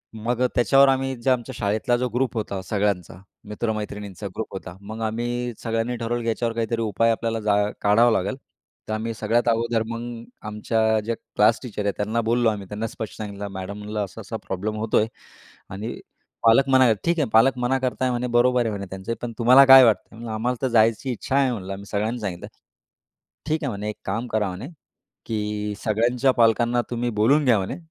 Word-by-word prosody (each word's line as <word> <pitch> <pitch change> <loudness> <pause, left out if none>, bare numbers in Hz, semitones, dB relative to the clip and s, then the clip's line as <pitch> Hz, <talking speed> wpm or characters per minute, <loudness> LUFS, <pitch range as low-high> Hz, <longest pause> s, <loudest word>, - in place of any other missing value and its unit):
मग 115 +2 -2
अ, 125 - +4
त्याच्यावर 135 +3 +5
आम्ही 135 0 0
जे 130 - +1
आमच्या 130 0 0
शाळेतला 110 +3 0
जो 125 +1 -1
ग्रुप 125 +2 -1
होता 100 -3 -3
सगळ्यांचा. 100 -4 -1 0.3
मित्र-मैत्रिणींचा 105 -2 -4
ग्रुप 110 - -5
होता. 90 -2 -7
मग 110 +3 -8
आम्ही 120 +2 -2
सगळ्यांनी 115 +1 -1
ठरवलं 120 +1 -2
याच्यावर 115 0 -1
काहीतरी 115 0 -1
उपाय 115 +1 +2
आपल्याला 115 0 -1
जा 105 -1 +1 0.3
काढावं 115 +4 +4
लागेल. 100 +7 0 0.5
तर 110 - -3
आम्ही 110 +1 -2
सगळ्यात 120 +2 0
अगोदर 115 0 +1
मग, 115 0 -6 0.2
आमच्या 110 +1 +1
जे 115 +1 -1
क्लास 110 +1 +1
टीचर 110 -4 -5
आहे, 100 - +1
त्यांना 110 +3 0
बोललो 115 +1 +2
आम्ही. 100 -3 -5
त्यांना 105 +3 -4
स्पष्ट 110 -1 -7
सांगितलं, 100 -2 -6
मॅडम 95 +1 -6
म्हणलं 105 +1 -5
असा-असा 110 +4 -7
प्रॉब्लेम 100 +3 -3
होतोय 110 0 +1 0.6
आणि 105 +5 -6 0.4
पालक 115 +4 +5
मना 130 -1 +6
आहे. 120 -3 +5
ठीक 170 0 +1
आहे 145 - 0
पालक 120 +4 +5
मना 125 +2 +1
करता 130 0 -2
आहे, 130 - +1
म्हणे 125 0 -1
बरोबर 125 +1 +4
आहे 115 - 0
म्हणे 100 -1 -5
त्यांचे, 95 +4 -4
पण 120 -1 -4
तुम्हाला 125 +3 +7
काय 135 0 +10
वाटतं? 115 0 0
"आम्हाला 120 +4 -1
तर 130 - +1
जायची 115 +2 +2
इच्छा 125 +3 -3
आहे 135 -2 +3
म्हणलं", 95 -5 -5
आम्ही 100 +1 -8
सगळ्यांनी 110 +4 -2
सांगितलं. 95 -5 -5 1.0
ठीक 155 0 -1
आहे 140 - -1
म्हणे, 105 0 -4
एक 105 - -6
काम 115 +6 -2
करा 110 -3 0
म्हणे, 95 +8 -7 0.6
की 105 -1 -3
सगळ्यांच्या 120 +5 +2
पालकांना 120 +1 +3
तुम्ही 120 0 -1
बोलून 140 +6 +4
घ्या 120 -3 +5
म्हणे. 95 - -4
115 Hz, 190 wpm, -23 LUFS, 105-120 Hz, 1.0 s, काय